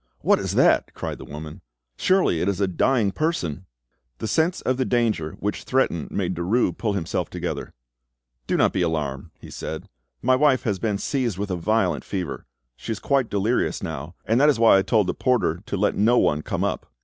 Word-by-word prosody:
"What - - +3
is - - -3
that?" - - +3
cried - - -5
the - - -9
woman. 75 +1 -8 0.3
"Surely 185 - +2
it 95 - +1
is 100 - -2
a 100 - +2
dying 105 +3 +2
person!" 95 - -2 0.5
The 110 - -4
sense 160 - +1
of 130 - 0
the 130 - +1
danger 115 -12 0
which 105 +1 -4
threatened 125 - 0
made 95 -2 -1
Derues 90 +8 +1
pull 105 -3 0
himself 95 -5 -2
together. - - -4 0.8
"Do - - +1
not - - +3
be 95 - 0
alarmed," 75 -5 -2
he - - -12
said. 80 0 -6 0.4
"My 130 +2 +4
wife 135 -2 +3
has 105 -7 -1
been 105 -1 0
seized 120 -3 -1
with 100 0 -3
a - - 0
violent 110 +6 0
fever; 90 -10 -5 0.3
she - - -6
is 110 - -2
quite 135 0 +1
delirious 105 +4 0
now, 80 +2 -5
and 115 +4 +2
that 150 - +6
is 145 - +3
why 115 -4 +6
I - - +3
told 105 +1 +2
the 90 - -1
porter 120 -9 +1
to 100 - -2
let 105 +2 +2
no 115 +4 +3
one 75 -8 +2
come - - -3
up." - - -3
100 Hz, 205 wpm, -24 LUFS, 85-125 Hz, 0.8 s, that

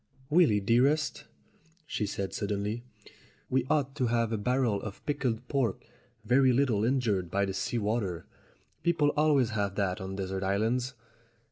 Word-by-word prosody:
"Willy, 150 -11 +5
dearest," 130 +9 +2 0.6
she 105 -9 -2
said 100 -1 -4
suddenly, 105 +3 -2 0.7
"we 130 0 +1
ought 140 -3 +1
to 130 -4 +1
have 115 -1 +1
a 110 - 0
barrel 125 -2 +1
of 105 -2 -8
pickled 130 -5 -1
pork, 130 -8 -1 0.4
very 130 +2 +4
little 120 -5 +2
injured 110 -8 +1
by 100 +3 +1
the 95 - -3
sea 120 - -2
water. 105 -5 -1 0.6
People 165 -4 +2
always 145 -6 +3
have 100 -2 -1
that 95 -3 -1
on 95 0 -5
desert 95 -1 -3
islands." 115 +7 0
115 Hz, 145 wpm, -29 LUFS, 100-130 Hz, 0.7 s, Willy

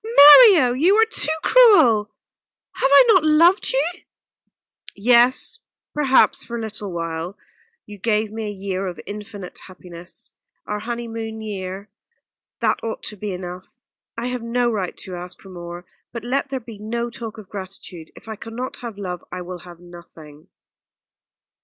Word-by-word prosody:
"Mario, 295 - +9
you 335 +10 +3
are 445 +1 +5
too 370 -9 0
cruel! 260 - +5 0.6
Have 270 - +1
I 280 - +8
not 375 -7 +5
loved 330 +5 +4
you?" 270 +3 +1 1.1
"Yes 245 - +3 0.3
perhaps 275 -3 +3
for 235 - -6
a - - -4
little 215 -3 -6
while. 165 +2 -5 0.5
You 205 -1 -12
gave 215 0 0
me 220 0 -5
a - - -4
year 195 -1 -4
of 180 - -7
infinite 205 -2 -8
happiness 180 -2 -10 0.3
our 210 0 -3
honeymoon 225 -1 -6
year. 195 -1 -6 0.7
That - - 0
ought 225 -1 -5
to 210 - -6
be 205 0 -5
enough. 180 0 -7 0.5
I 230 - -3
have 250 -1 -4
no 240 +1 0
right 195 -5 -3
to 185 -3 -8
ask 180 +1 -8
for 195 - -15
more 175 -1 -9 0.3
but 235 -1 -7
let 270 +3 -1
there 265 -1 -3
be 230 -3 -12
no 235 +3 -4
talk 225 -2 -8
of 215 -3 -11
gratitude 185 -4 -9
if - - -16
I 220 - -5
cannot 235 +4 -7
have 235 -4 -8
love 180 -3 -6
I 180 - -5
will 180 0 -8
have 175 0 -13
nothing." 165 -4 -15
215 Hz, 160 wpm, -21 LUFS, 185-245 Hz, 1.1 s, Mario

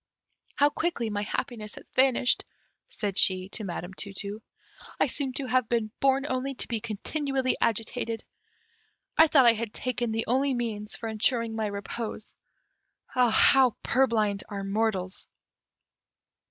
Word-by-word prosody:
"How 290 +1 +4
quickly 290 -9 -1
my 205 0 -1
happiness 215 0 -4
has - - -11
vanished," 260 -1 +3 0.5
said 200 -3 -1
she 185 0 +2
to 215 - -6
Madame 175 -1 -5
Tu 195 +1 -5
tu; 205 +2 -5 0.6
"I - - +5
seem 275 -4 -2
to 275 - -3
have 255 -2 +1
been 230 -2 0
born 270 0 +3
only 265 +1 -2
to - - -2
be 230 -2 -1
continually 260 +5 -1
agitated. 230 0 -1 0.9
I 320 - +7
thought 275 -4 +5
I 235 - +8
had 225 -1 -4
taken 245 -2 -1
the 225 +1 -1
only 265 +2 +1
means 220 -3 -3
for 225 - -5
ensuring 225 +1 0
my 220 -1 -1
repose; 210 +2 -5 0.7
how 250 +1 +4
purblind 220 -6 +2
are 200 -1 -4
mortals!" 195 -2 -1
230 Hz, 140 wpm, -27 LUFS, 210-255 Hz, 0.9 s, I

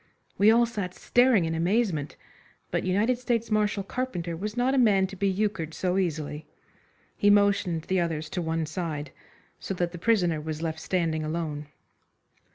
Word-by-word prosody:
We 205 +2 +6
all 235 +2 +5
sat 200 -6 -5
staring 245 -7 +3
in 160 - -2
amazement, 170 -3 0 0.6
but - - 0
United 210 +7 +1
States 235 -2 -1
Marshal 210 -1 +1
Carpenter 190 -8 -3
was 210 +6 -5
not 250 +2 +2
a 275 - +3
man 200 -6 +4
to 195 +1 -7
be 195 +1 +1
euchred 190 -5 -2
so 185 +1 0
easily. 155 -4 -3 0.7
He 205 - +3
motioned 200 -5 +3
the 185 +2 0
others 160 -3 -2
to 180 - -2
one 160 -1 -1
side, 155 -3 -4 0.5
so 195 - -4
that 175 -1 -1
the 175 - -8
prisoner 175 -7 +2
was 155 +1 -5
left 160 -1 -3
standing 160 -3 -1
alone. 155 -2 -3
185 Hz, 165 wpm, -27 LUFS, 160-210 Hz, 0.7 s, We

